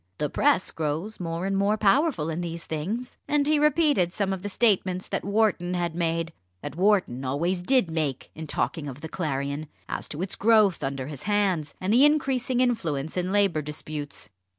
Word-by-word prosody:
The 150 - -2
press 285 -9 +2
grows 160 +7 -3
more 170 0 -3
and 195 0 0
more 200 +2 +2
powerful 215 - +2
in 165 +2 -3
these 170 -1 -5
things." 205 +11 -4
And 295 -1 +2
he 300 0 +3
repeated 295 - +3
some 195 0 -1
of 190 - -5
the 205 - -4
statements 190 -4 +1
that - - -2
Wharton 200 -4 +1
had 175 -2 -1
made 165 -1 -1 0.3
that - - -6
Wharton 185 -9 +2
always 170 +8 -1
did 220 -3 +2
make, 150 -5 -2
in 160 0 -7
talking 150 0 -2
of 135 +1 -8
the 160 - -5
Clarion 140 -2 -3 0.2
as - - -3
to 155 +4 -3
its 190 - 0
growth 215 -4 +4
under 135 -1 -3
his 145 -1 -7
hands, 190 -8 +1
and 190 +3 0
increasing 265 -2 +3
influence 160 - -1
in 180 0 -1
Labour 195 -6 +2
disputes. 150 -5 -6
180 Hz, 180 wpm, -26 LUFS, 155-215 Hz, 0.3 s, growth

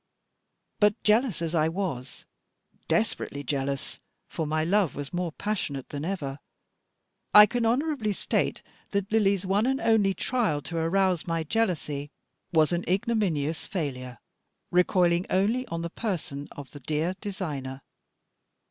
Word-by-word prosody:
But, 210 -1 +3
jealous 215 -4 +3
as 165 0 -2
I 160 -1 +3
was, 165 -8 -4 0.6
desperately 140 0 0
jealous, 140 -1 -2 0.3
for 160 -3 -3
my 155 +1 +1
love 185 0 +2
was 145 +2 -6
more 175 -1 -1
passionate 155 -8 -3
than 145 0 -5
ever, 145 -6 -3 1.0
I 210 0 +12
can 235 +1 0
honourably 260 -2 +1
state 200 - -1 0.3
that 200 0 -1
Lily's 200 -3 +3
one 200 +5 +2
and 265 +1 +1
only 205 -4 +3
trial 225 - 0
to 170 - -5
arouse 180 +1 +1
my 165 -1 0
jealousy 155 -7 -1 0.4
was 160 -2 +4
an 175 0 0
ignominious 185 - 0
failure, 130 - -4 0.5
recoiling 175 0 +3
only 220 +7 +1
on 165 0 -4
the 170 - -4
person 160 -11 -3
of 145 -2 -9
the 145 - -10
dear 155 +6 -1
designer. 145 -10 -5
175 Hz, 135 wpm, -27 LUFS, 150-205 Hz, 1.0 s, I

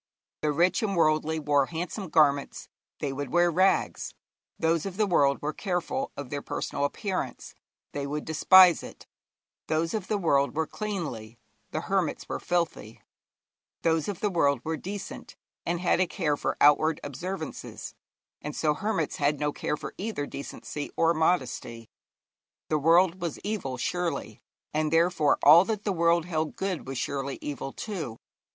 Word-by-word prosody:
The 150 - +1
rich 175 +5 +2
and 200 -3 -1
worldly 155 0 +2
wore 145 -2 +2
handsome 175 +3 -5
garments, 145 -3 +2 0.3
they 140 -2 -1
would 140 -1 -4
wear 175 0 +4
rags; 185 +4 +1 0.4
those 165 +1 +1
of 190 -1 -7
the 215 - +3
world 140 -7 +3
were 150 +1 -1
careful 195 - -2
of 140 -3 -7
their 145 -1 -3
personal 140 - -2
appearance, 190 +5 -4 0.4
they 140 -1 -3
would 150 +1 -4
despise 180 +2 +7
it; - - -11 0.6
those 160 +1 0
of 215 -4 -3
the 210 - 0
world 140 -7 +2
were 160 +1 +1
cleanly, 150 - -5 0.3
the - - -3
hermits - - -1
were - - -3
filthy; 170 -11 -2 0.8
those 160 -2 +2
of 200 -4 -4
the 210 - +1
world 140 -6 +2
were 160 +1 -2
decent, 195 +4 -7 0.3
and 170 +1 -1
had 180 - +2
a 185 - +3
care 160 -5 0
for - - -2
outward 150 +2 +5
observances, 160 +4 -6 0.5
and 150 0 -5
so 150 -1 +2
hermits 180 -3 -2
had 145 0 +1
no 150 0 0
care 150 - -2
for - - -7
either 200 -8 -3
decency 145 +1 -6
or 165 0 +4
modesty. 130 -8 -1 0.8
The 155 - +2
world 170 +4 +4
was 170 -4 -3
evil, 195 -12 -3
surely, 175 +6 -3 0.3
and 155 0 0
therefore 165 -2 +3
all 160 +4 +9
that 210 -1 -2
the 200 - 0
world 170 -1 +3
held 160 -3 -2
good 190 -7 -3
was 135 -1 -4
surely 140 +1 -3
evil 140 -2 -5
too. 160 - -5
160 Hz, 160 wpm, -27 LUFS, 145-180 Hz, 0.8 s, all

